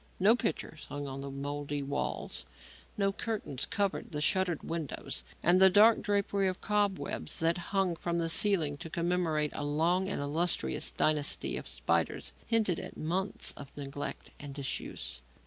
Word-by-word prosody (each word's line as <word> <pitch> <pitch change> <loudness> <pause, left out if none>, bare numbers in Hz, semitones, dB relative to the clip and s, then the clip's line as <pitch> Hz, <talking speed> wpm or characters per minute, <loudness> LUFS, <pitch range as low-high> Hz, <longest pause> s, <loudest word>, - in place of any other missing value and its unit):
No 205 +5 +6
pictures 160 -7 -3
hung 145 0 -4
on 135 0 -5
the 140 - -5
mouldy 145 +1 -3
walls, 140 +1 -2 0.5
no 195 -1 +2
curtains 205 - -3
covered 200 -2 -1
the 150 - -1
shuttered 180 +1 +1
windows, 165 -3 -3 0.2
and 180 +3 +5
the 190 - +9
dark 215 +4 +6
drapery 200 -1 +1
of 185 -1 -2
cobwebs 205 -2 -1
that 165 +2 +2
hung 195 -3 +1
from 170 +1 -2
the 165 -1 +1
ceiling 165 -4 +3
to 165 - -7
commemorate 170 -3 0
a - - -3
long 170 +6 +2
and - - -1
illustrious 160 +5 0
dynasty 150 -2 +1
of - - -5
spiders 60 -2 -1
hinted 220 -7 +2
at - - -7
months 185 +5 -1
of 140 0 -11
neglect 145 0 -5
and 140 -2 -8
disuse. 65 - -3
165 Hz, 155 wpm, -31 LUFS, 145-190 Hz, 0.5 s, the